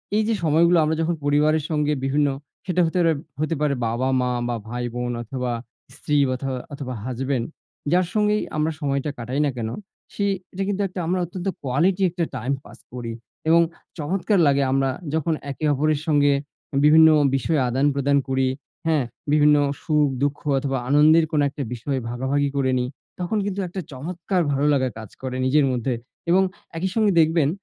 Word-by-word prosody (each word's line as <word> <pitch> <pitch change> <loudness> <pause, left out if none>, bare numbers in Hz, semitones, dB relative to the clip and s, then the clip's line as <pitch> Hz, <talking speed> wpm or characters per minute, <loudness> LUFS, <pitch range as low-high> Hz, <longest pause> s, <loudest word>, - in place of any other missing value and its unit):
এই 215 - +3
যে, 225 - +2
সময়গুলো 170 +3 +4
আমরা 155 +1 +1
যখন 165 +1 0
পরিবারের 150 +1 +3
সঙ্গে 150 -1 +1
বিভিন্ন 145 +2 +2 0.4
সেটা 180 -1 +1
হতে 165 +3 -1
পারে, 165 -1 +4 0.3
হতে 155 +1 0
পারে 145 -2 +2
বাবা-মা 125 +2 0 0.2
বা 120 - -1
ভাই-বোন 120 0 -3
অথবা 125 +1 -3 0.4
স্ত্রী 150 0 -1
বথো 130 +1 -2 0.2
অথবা 140 -3 -5
হাসব্যান্ড। 130 -1 -2 0.5
যার 180 +1 +4
সঙ্গেই 210 0 +2 0.2
আমরা 155 +1 +1
সময়টা 140 -1 -1
কাটাই 125 +4 -3
না 145 - +2
কেন, 110 -2 -2 0.4
সে 200 - -1 0.3
এটা 195 - -2
কিন্তু 205 0 -1
একটা 185 0 -7
আমরা 185 +2 +1
অত্যন্ত 175 +2 -6 0.2
কোয়ালিটি 170 +9 +1
একটা 175 0 -2
টাইম 125 +3 -1
পাস - - -14
করি 120 -2 -5 0.4
এবং 170 +1 +6 0.4
চমৎকার 185 +6 0
লাগে 140 0 +3
আমরা 135 0 +2 0.2
যখন 160 +1 +1 0.2
একে 145 +4 -4
অপরের 150 +1 +1
সঙ্গে 145 -2 +4 0.5
বিভিন্ন 160 +1 +8 0.3
বিষয়ে 145 +2 +1
আদান-প্রদান 140 +2 +2
করি। 130 0 +2 0.4
হ্যাঁ? 155 -4 +3 0.3
বিভিন্ন 150 0 +5 0.3
সুখ-দুঃখ 145 -2 +1 0.2
অথবা 135 0 -1
আনন্দের 155 +3 +6
কোনো 150 -2 +2
একটা 140 +1 -5
বিষয় 130 +3 -3
ভাগাভাগি 135 +4 0
করে 130 -1 +2
নিই। 125 - -1 0.3
তখন 180 +5 -1
কিন্তু 200 -1 -3
একটা 185 +2 -5
চমৎকার 175 +7 -2
ভালো 140 +1 +1
লাগা 130 -2 +1
কাজ 110 -2 -8
করে 130 -1 -4
নিজের 140 +2 +4
মধ্যে 125 0 -1 0.4
এবং 190 +2 +5 0.3
একই 185 +3 -1
সঙ্গে 215 -3 +3
দেখবেন 160 -2 +3
145 Hz, 165 wpm, -23 LUFS, 130-165 Hz, 0.5 s, বিভিন্ন